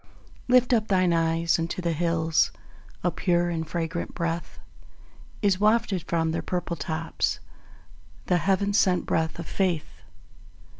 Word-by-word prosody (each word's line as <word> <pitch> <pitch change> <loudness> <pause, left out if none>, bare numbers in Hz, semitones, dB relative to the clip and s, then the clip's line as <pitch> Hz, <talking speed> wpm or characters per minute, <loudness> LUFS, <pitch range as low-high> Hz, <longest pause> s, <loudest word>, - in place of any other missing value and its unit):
Lift 250 0 +4
up 220 -2 +2
thine 185 -3 +3
eyes 165 0 +1
unto 165 +2 -3
the 170 -2 0
hills; 165 -1 +1 0.5
A 180 - +2
pure 175 -1 +1
and 160 -1 -3
fragrant 170 0 -3
breath 170 -1 -3 0.9
Is 195 -2 +3
wafted 210 -3 +2
from 165 -1 0
their 165 - -2
purple 180 -1 -3
tops, 160 +2 -2 0.9
The 180 - +2
Heaven 200 +2 +1
sent 185 -3 +3
breath 160 -1 0
of 170 - -6
Faith. 180 -5 -2
170 Hz, 135 wpm, -26 LUFS, 165-190 Hz, 0.9 s, Lift